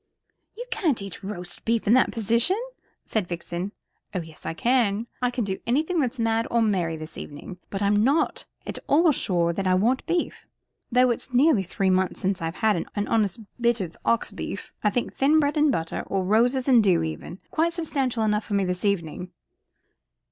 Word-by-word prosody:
"You 485 - -5
can't 355 - +1
eat 195 -3 -8
roast 180 -3 -5
beef 230 0 0
in 210 - +4
that 255 - +4
position," 230 - +2 0.5
said 215 -5 -1
Vixen. 175 +2 -4 0.4
"Oh 180 - 0
yes 160 -1 -11
I 165 - -3
can 230 -1 +2 0.2
I 250 - +2
can 245 -1 -2
do 190 -2 -3
anything 310 +8 +1
that's 265 -2 0
mad 225 0 +1
or 235 - +2
merry 180 -7 0
this 155 +1 -8
evening. 165 +5 -9
But 195 0 -3
I'm 205 +1 +3
not 285 +6 +1 0.2
at - - -4
all 320 +3 +5
sure 175 -9 +1
that 195 +2 -2
I 185 - +4
want 235 +8 +2
beef, 345 0 -2 0.4
though 250 +1 +4
it 235 - 0
is 255 - -12
nearly 265 -4 +5
three 190 +1 0
months 185 -1 +1
since 190 -1 -1
I've 165 +2 -3
seen 215 -6 +2
an 205 -1 -1
honest 215 -2 +1 0.2
bit 235 0 +3
of 175 -4 -5
ox 230 - +1
beef. - - -6
I 210 - +4
think 240 +3 -2
thin 295 +4 +4
bread 290 0 +1
and 300 -1 +4
butter 165 -9 -2
or 195 -1 0
roses 245 +7 +2
and 245 -4 +6
dew 175 -5 +3
even 160 +2 -5
quite 335 +2 +1
substantial 275 -8 -1
enough 210 0 +1
for 205 - -2
me 200 - +2
this 180 0 -3
evening." 180 -3 -1
215 Hz, 200 wpm, -25 LUFS, 185-255 Hz, 0.5 s, and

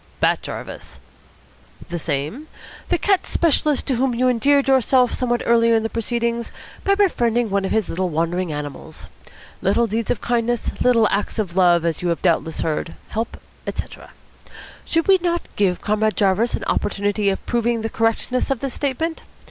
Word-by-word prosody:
"Bat - - +2
Jarvis." - - -8 0.9
"The 175 0 -3
same. 155 - -3 0.4
The 350 - +2
cat 390 +2 +1
specialist 305 -3 +1
to 260 -4 0
whom 255 -1 +1
you 255 +2 +2
endeared 275 +3 +3
yourself 260 -1 +3
somewhat 240 -1 0
earlier 230 -1 +4
in 220 - +2
the 225 - -3
proceedings 235 0 -2 0.3
by 395 - +3
befriending 240 - +1
one 200 0 +1
of - - -3
his 220 -2 +1
wandering 175 0 -1
animals. 145 -2 -7 0.5
Little 205 +5 +2
deeds 225 0 -2
of 240 - 0
kindness, 240 0 0
little 230 -3 +4
acts 205 +3 -1
of 190 -6 -2
love, 175 -3 +4
as 165 -2 -1
you 180 - -1
have 170 - -2
doubtless 165 -2 +1
heard, 160 +1 -2
help, 225 +2 -4 0.3
etc. - - -6 0.8
Should 330 -1 0
we 385 -1 +6
not 345 -1 -1
give 190 -3 +1
Comrade 215 +1 0
Jarvis 200 +4 +2
an - - -5
opportunity 205 0 0
of 195 - -3
proving 235 -1 0
the - - 0
correctness 225 +3 0
of 270 -3 0
this 270 -1 -4
statement? 320 +4 -2
230 Hz, 165 wpm, -21 LUFS, 195-255 Hz, 0.9 s, we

